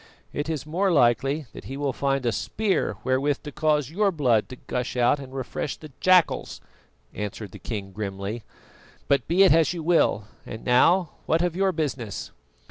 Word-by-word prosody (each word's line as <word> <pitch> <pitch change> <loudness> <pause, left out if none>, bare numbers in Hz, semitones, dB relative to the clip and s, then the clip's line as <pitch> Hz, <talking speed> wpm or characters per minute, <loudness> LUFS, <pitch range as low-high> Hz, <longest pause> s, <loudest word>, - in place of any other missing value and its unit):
"It 145 +2 -3
is 155 -4 -3
more 185 +5 +1
likely 135 +1 +2
that - - -10
he 135 - -6
will 140 -2 -1
find 135 -1 -1
a 120 - +2
spear 200 - -1
wherewith 135 +2 0
to 150 - -7
cause 150 -1 +1
your 200 +3 +2
blood 125 - +2
to 130 - -7
gush 125 0 -4
out 125 +4 +3
and 135 -2 -9
refresh 135 +1 -4
the 155 -2 -12
jackals," 185 -2 +3 0.5
answered 105 -1 -5
the - - -11
king 100 -4 -5
grimly; 100 +2 -4 0.7
"but 140 - +2
be 180 +4 +5
it 190 - +6
as 160 -1 +3
you 170 -2 -5
will. 165 -10 +3 0.2
And 110 - -9
now, 165 +8 +4 0.2
what 165 +2 +2
of 175 -2 -1
your 190 +1 +2
business?" 135 - -4
140 Hz, 180 wpm, -25 LUFS, 120-165 Hz, 0.7 s, it